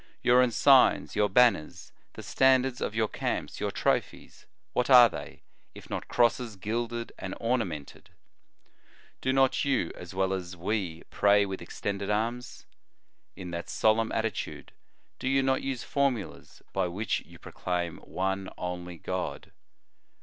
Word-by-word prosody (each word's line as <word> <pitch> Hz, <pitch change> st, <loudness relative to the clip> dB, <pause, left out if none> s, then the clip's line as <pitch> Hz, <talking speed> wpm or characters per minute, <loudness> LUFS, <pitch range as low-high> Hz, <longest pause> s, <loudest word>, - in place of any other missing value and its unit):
"Your 125 Hz, +1 st, +6 dB
emigns, 125 Hz, +2 st, +4 dB
your 105 Hz, -1 st, +2 dB
banners, 115 Hz, -7 st, +2 dB, 0.2 s
the -, -, -9 dB
standards 130 Hz, -1 st, +2 dB
of 110 Hz, -, -2 dB
your 110 Hz, -1 st, +2 dB
camps, -, -, -3 dB
your -, -, -1 dB
trophies -, -, -2 dB, 0.3 s
what 125 Hz, -, 0 dB
are 125 Hz, -2 st, +9 dB
they, -, -, -9 dB, 0.3 s
if -, -, -13 dB
not -, -, -4 dB
crosses 120 Hz, -2 st, +1 dB
gilded 115 Hz, +4 st, -3 dB
and -, -, -5 dB
orna 120 Hz, 0 st, +1 dB
mented? 75 Hz, -6 st, -9 dB, 1.1 s
Do 130 Hz, -, +1 dB
not 135 Hz, 0 st, +3 dB
you, 135 Hz, -11 st, 0 dB
as 90 Hz, +1 st, -10 dB
well 95 Hz, 0 st, +1 dB
as 90 Hz, -1 st, -5 dB
we, 90 Hz, -3 st, -3 dB
pray 100 Hz, 0 st, +4 dB
with 95 Hz, -1 st, -6 dB
extended 100 Hz, 0 st, -4 dB
arms? 115 Hz, +4 st, -2 dB, 0.7 s
In 90 Hz, -3 st, -7 dB
that 85 Hz, 0 st, -5 dB
solemn 110 Hz, +1 st, +2 dB
attitude 110 Hz, -3 st, -3 dB, 0.5 s
do 130 Hz, -, -2 dB
you 135 Hz, 0 st, +3 dB
not 130 Hz, 0 st, +1 dB
use 135 Hz, -3 st, -3 dB
formulas 135 Hz, -7 st, -2 dB
by -, -, +1 dB
which 95 Hz, +5 st, -2 dB
you -, -, -16 dB
pro -, -, -12 dB
claim 90 Hz, -2 st, -3 dB
one 95 Hz, +1 st, -3 dB
only 90 Hz, -1 st, -5 dB
God? 90 Hz, +3 st, -5 dB
110 Hz, 145 wpm, -28 LUFS, 95-125 Hz, 1.1 s, are